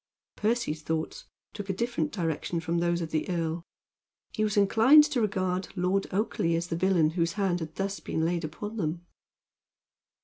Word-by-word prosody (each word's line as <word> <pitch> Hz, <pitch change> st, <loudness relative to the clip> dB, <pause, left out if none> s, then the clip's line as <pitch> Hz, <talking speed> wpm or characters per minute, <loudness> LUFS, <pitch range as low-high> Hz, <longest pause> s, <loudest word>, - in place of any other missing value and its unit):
Percy's 210 Hz, -8 st, 0 dB
thoughts 160 Hz, 0 st, -3 dB, 0.3 s
took 205 Hz, -1 st, -7 dB
a -, -, +1 dB
different 195 Hz, -7 st, -1 dB
direction 170 Hz, -2 st, -2 dB
from 165 Hz, +1 st, -1 dB
those 170 Hz, 0 st, +1 dB
of 160 Hz, -1 st, -4 dB
the 155 Hz, +2 st, -1 dB
earl. 165 Hz, -1 st, -1 dB, 0.7 s
He 215 Hz, -, 0 dB
was 210 Hz, -1 st, 0 dB
inclined 225 Hz, +9 st, +7 dB
to 295 Hz, -5 st, 0 dB
regard 185 Hz, -3 st, 0 dB
Lord 185 Hz, +2 st, +1 dB
Oakleigh 185 Hz, -4 st, 0 dB
as 170 Hz, +1 st, -3 dB
the 165 Hz, -, -1 dB
villain 170 Hz, -3 st, +3 dB
whose 170 Hz, 0 st, 0 dB
hand 195 Hz, -4 st, 0 dB
had 160 Hz, -1 st, -6 dB
thus 195 Hz, 0 st, -2 dB
been 160 Hz, -, -2 dB
laid 170 Hz, 0 st, 0 dB
upon 205 Hz, +8 st, -6 dB
them. 170 Hz, -2 st, -2 dB
180 Hz, 170 wpm, -28 LUFS, 165-205 Hz, 0.7 s, inclined